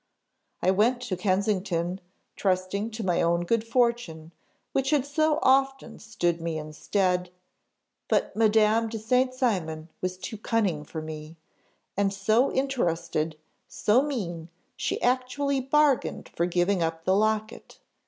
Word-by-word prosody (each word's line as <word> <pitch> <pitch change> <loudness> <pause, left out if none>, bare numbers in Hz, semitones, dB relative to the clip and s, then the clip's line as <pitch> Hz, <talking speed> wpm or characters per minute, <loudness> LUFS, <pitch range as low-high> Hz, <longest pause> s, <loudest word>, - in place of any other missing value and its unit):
"I 185 - +4
went 225 +6 +2
to 240 -7 -3
Kensington, 185 -1 0 0.3
trusting 190 +2 0
to 225 0 -6
my 175 -2 +2
own 170 0 +2
good 230 +4 +1
fortune, 230 -9 0 0.4
which 270 0 0
had 285 -3 +2
so 310 +1 +1
often 270 -2 +2
stood 175 -6 -1
me 165 -1 -2
in 155 0 -7
stead; 180 +1 0 0.8
but - - 0
Madame 220 +1 +3
de 225 - -4
St. 250 +4 +2
Cymon 180 - -1
was 185 0 -2
too 210 +3 -7
cunning 205 -10 0
for 155 +1 -7
me, 155 0 -8 0.6
and 195 0 +1
so 215 +6 +2
interested, 170 - -1 0.3
so 220 +5 +2
mean, 180 - -4 0.3
she - - -2
actually 260 +3 +1
bargained 280 0 +1
for 170 - -1
giving 180 +1 +1
up 165 0 -2
the 190 - +3
locket. 215 +1 -1
205 Hz, 135 wpm, -27 LUFS, 175-245 Hz, 0.8 s, I